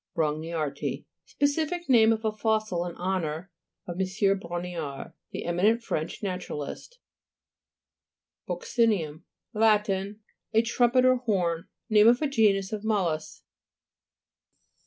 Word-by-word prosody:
BRONGXIARTII 155 -2 -2 0.2
Specific 315 +4 -1
name 225 -4 +6
of 220 0 -1
a 220 - +2
fossil 215 -5 0
in 175 - -7
honour 175 -1 -3 0.3
of 175 0 -6
M. 195 +1 +1
Brongniart, 170 -5 -5 0.2
the - - -6
eminent 205 +7 +2
French 160 0 -3
naturalist, 180 - -5 1.5
(p. - - -1
60.) 235 -2 +2
BUC'CINUM 160 -7 -1 0.3
Lat. 215 -1 +4
A 205 +3 -2
trumpet 240 +2 +3
or 255 0 +5
horn. 180 -9 -1 0.2
Name 215 -1 +6
of 240 +1 +6
a - - +2
genus 210 -7 +2
of 210 -1 -4
mol 215 -4 +1
lusks. 155 0 -7
200 Hz, 120 wpm, -27 LUFS, 170-225 Hz, 1.5 s, name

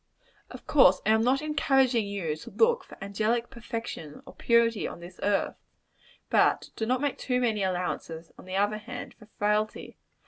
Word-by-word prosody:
Of - - -11
course, 190 -11 +5
I 215 - +4
am 220 0 +4
not 260 +5 +2
encouraging 270 -6 +2
you 185 -7 -3
to - - -10
look 470 +1 +2
for - - -14
angelic 220 +5 -1
perfection 230 - -7
or - - -12
purity 235 -2 +2
on - - -8
this 175 +1 -12
earth; 205 -1 0 0.7
but - - +3
do 220 - -2
not 255 +1 +1
make 290 -2 -1
too 250 -1 0
many 225 -4 0
allowances, 180 -3 -3
on - - -14
the 185 0 -5
other 205 +2 +1
hand, 245 +3 -8
for 215 - -15
frailty. 210 +1 -1
220 Hz, 175 wpm, -28 LUFS, 195-250 Hz, 0.7 s, course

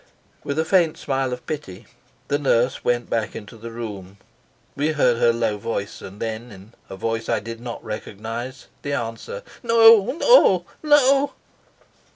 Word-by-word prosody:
With 140 - -3
a 160 - +1
faint 170 -3 +3
smile 135 -2 -1
of 125 - -6
pity, 145 -12 -6 0.4
the 145 - 0
nurse 125 -3 +1
went 120 -1 0
back 110 -2 -2
into 105 +2 -9
the 115 +1 -9
room. 100 -5 -7 0.6
We 150 +2 0
heard 125 -5 +3
her 120 - +5
low 115 -3 -1
voice, 100 -1 -4
and 100 +2 -10
then, 115 +1 -5
in 100 +3 -14 0.2
a - - -7
voice 115 +3 -3
I - - +2
did 115 +2 -8
not 120 -1 -7
recognise 115 +4 -6 0.2
the 145 - -3
answer: 120 - -5 0.2
"No. 230 -2 +7 0.2
No. 195 - +6 0.2
No." 285 -2 +4
120 Hz, 160 wpm, -22 LUFS, 110-155 Hz, 0.6 s, No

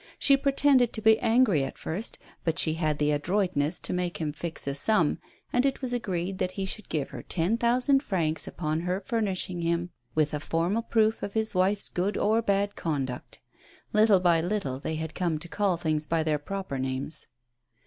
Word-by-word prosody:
She 275 - +5
pretended 275 -3 +3
to 220 - -4
be 220 0 +6
angry 225 - +3
at 135 - -5
first, 200 +8 -2 0.3
but 165 -1 0
she 155 - +3
had 155 -2 0
the 150 0 +2
adroitness 170 0 0
to - - -3
make 180 -1 -2
him 155 -3 -3
fix 165 +2 -5
a 140 - -1
sum, 165 +2 +2 0.3
and 250 - +3
it 275 -1 0
was 250 -1 -1
agreed 190 -5 -2
that 185 0 -1
he 195 - -3
should 205 +2 -4
give 145 -4 -2
her - - -7
ten 180 +5 0
thousand 250 +4 +3
francs 165 - -1
upon 155 -2 -2
her 180 +2 -1
furnishing 190 -6 -1
him 170 +1 -1 0.2
with 155 -1 +2
a 150 - -1
formal 170 +8 0
proof 220 -1 +1
of 200 - -4
his 220 -1 0
wife's 195 +2 +1
good 190 +4 -1
or 220 +2 +2
bad 200 -1 0
conduct. 135 -6 -4 0.5
Little 215 -2 +5
by 170 -2 +3
little 175 -8 -2
they 160 +3 -3
had 160 0 -4
come 175 -4 -1
to 155 - -8
call 195 -1 0
things 155 -2 -1
by 165 -1 +1
their 155 -1 0
proper 190 -3 -4
names. 130 +4 -3
180 Hz, 195 wpm, -27 LUFS, 155-215 Hz, 0.5 s, be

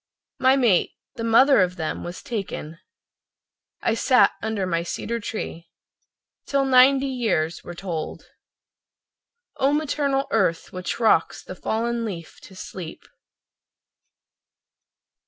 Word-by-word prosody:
My 260 +1 +5
mate, 235 -9 +2 0.2
the 230 - -6
mother 235 +2 +5
of 180 -1 +1
them, 160 -3 -4
was 175 +1 -7
taken— 190 -7 -5 1.0
I 230 - +2
sat 250 +2 +4
under 220 -3 -2
my 170 -2 0
cedar 230 +7 -4
tree, 170 -6 -6 0.8
Till 275 -1 +1
ninety 265 +1 +5
years 215 -12 -1
were 175 - -8
tolled. 170 -4 -5 1.3
O 270 +1 +2
maternal 285 -2 0
Earth, 185 -6 0
which 185 +3 -4
rocks 220 -8 +2
the - - -8
fallen 230 +5 -2
leaf 175 -7 -7
to 190 - -14
sleep. 185 -2 -8
220 Hz, 115 wpm, -24 LUFS, 175-260 Hz, 1.3 s, My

